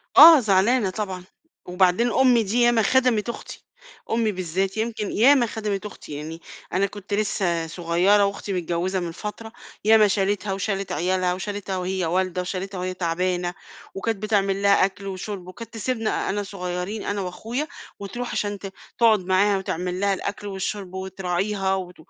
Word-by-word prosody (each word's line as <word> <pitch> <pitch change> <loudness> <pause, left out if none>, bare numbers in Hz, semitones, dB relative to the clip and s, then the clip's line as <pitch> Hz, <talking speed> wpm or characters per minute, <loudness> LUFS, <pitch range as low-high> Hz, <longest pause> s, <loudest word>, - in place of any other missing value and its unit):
آه 325 -2 +11
زعلانة 210 +1 +3
طبعًا 185 -2 -4 0.4
وبعدين 185 +6 +2
أمي 250 -4 +4
دي 225 +5 0
يا 240 0 +6
ما 225 -2 +3
خدَمِت 240 -1 +2
أختي، - - -8 0.5
أمي 225 -2 +2
بالذات 190 +2 -2
يمكن 220 -2 -2
ياما 255 +2 +5
خدَمِت 210 -3 -3
أختي 180 -7 -9
يعني، 155 +3 -7 0.3
أنا 195 +2 +3
كنت 200 0 -7
لسّه 180 -5 0
صغيّرة 180 +5 +3
وأختي 200 0 -3
متجوّزة 180 +2 -1
من 170 -2 -4
فترة، 215 +5 -7 0.3
ياما 215 -1 +6
شالِتها 195 0 0
وشالِت 195 -1 -2
عيالها 180 +2 +1
وشالِتها 195 0 -4
وهي 185 -1 -2
والدة 180 +1 0
وشالِتها 185 +1 -4
وهي 185 0 -3
تعبانة 180 0 -1 0.4
وكانت 220 +2 -1
بتعمل 200 -2 +1
لها 200 -1 +5
أكْل 195 +1 -6
وشُرب 190 -1 -6
وكانت 230 +5 -10
تسيبنا 225 0 -1
أنا 205 +1 -1
صغيّرين 180 +2 -4
أنا 205 -1 -2
وأخويا 225 +11 -4 0.3
وترُوح 240 +5 -5
عشان 205 -1 -2
ت 195 -1 -8 0.2
تقعد 225 -3 +5
معاها 195 +2 +3
وتعمل 180 -1 -3
لها 200 0 +2
الأكْل 205 +2 -4
والشُرب 195 -1 -4
وتراعيها 190 +1 -1
وت 180 -1 -6
195 Hz, 155 wpm, -24 LUFS, 185-215 Hz, 0.5 s, آه